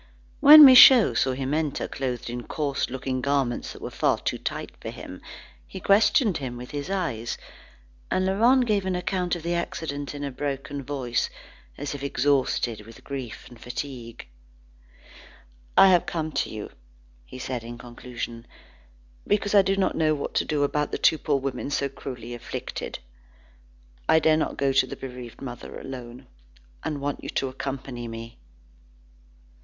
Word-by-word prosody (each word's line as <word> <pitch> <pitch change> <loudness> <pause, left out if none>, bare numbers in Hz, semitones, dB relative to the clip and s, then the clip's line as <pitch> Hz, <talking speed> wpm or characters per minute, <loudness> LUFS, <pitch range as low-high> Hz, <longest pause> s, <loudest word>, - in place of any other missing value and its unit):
When 300 +1 +11
Michaud 255 -3 +9
saw 130 - +1
him 135 +2 -3
enter, 155 -2 -1
clothed 125 -3 -4
in 120 0 -4
coarse 145 -3 -2
looking 130 0 -3
garments 140 -3 0
that - - -11
were - - 0
too - - -1
tight - - -4
for - - -5
him, - - -9 0.5
he - - -8
questioned 205 - +3
him 130 -4 -5
with 125 +1 -9
his 145 +2 -5
eyes, 165 - -2 0.7
and 185 - +1
Laurent 235 +7 +4
gave 205 -4 0
an 185 - 0
account 180 0 -1
of 170 - -8
the 170 +1 -1
accident 160 -5 -4
in 145 - -5
a 140 - -3
broken 140 0 -4
voice, 130 -3 -2 0.5
as 145 0 -4
if 140 - -7
exhausted 135 -5 0
with 115 +2 -14
grief 130 -8 -6
and 120 -2 -15
fatigue. 125 -2 -7 1.5
"I 195 - +9
have 180 -2 +4
come 155 -2 -3
to - - -1
you," 110 -1 -7 0.7
said 125 -1 -4
he 115 - -11
in 120 0 -7
conclusion, 120 -1 -7 0.8
"because 205 0 +1
I 200 - +8
do 195 0 0
not 195 - +1
know 155 -1 +2
what 140 - -5
to - - +1
do 150 -1 0
about 150 +1 0
the - - -2
two 160 - +3
poor 145 - 0
women 135 0 -4
so 140 -1 -1
cruelly 125 -3 -8
afflicted. 120 - -6 1.1
I - - +6
dare 160 0 +4
not 155 - -2
go 135 -1 +1
to 130 -1 +3
the - - -6
bereaved 125 -1 -9
mother 120 -3 -7
alone, 125 0 -9 0.6
and 145 -2 -3
want 145 0 -3
you - - -6
to 135 - -1
accompany 130 -2 -5
me." 115 0 -9
140 Hz, 165 wpm, -25 LUFS, 125-160 Hz, 1.5 s, When